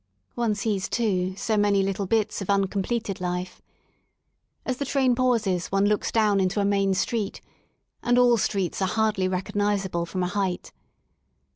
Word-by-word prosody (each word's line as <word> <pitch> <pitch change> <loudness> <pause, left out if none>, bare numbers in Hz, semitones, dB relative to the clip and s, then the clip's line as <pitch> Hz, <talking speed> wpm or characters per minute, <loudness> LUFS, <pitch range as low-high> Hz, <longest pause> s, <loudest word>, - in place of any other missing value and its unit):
One 235 -3 0
sees, 200 -2 -2
too, 185 -5 0
so 220 +1 0
many 205 -1 +3
little 195 0 -2
bits 215 0 0
of 195 - -6
un 200 -1 +3
completed 200 0 -3
life. 180 0 -4 1.0
As 255 -1 -2
the 280 - -2
train 265 -2 +2
pauses 230 -8 +1
one 195 +1 +1
looks 210 0 +1
down 210 -3 +3
into 190 +2 0
a 200 - +2
main 195 -1 +2
street 205 +2 -2 0.3
— - - -50
and 245 0 +2
all 245 -1 +5
streets 195 -3 -1
are 190 - +2
hardly 210 -2 +1
recognizable 195 -2 -1
from 185 +1 -2
a - - 0
height. 190 -2 -2
200 Hz, 165 wpm, -25 LUFS, 190-220 Hz, 1.0 s, all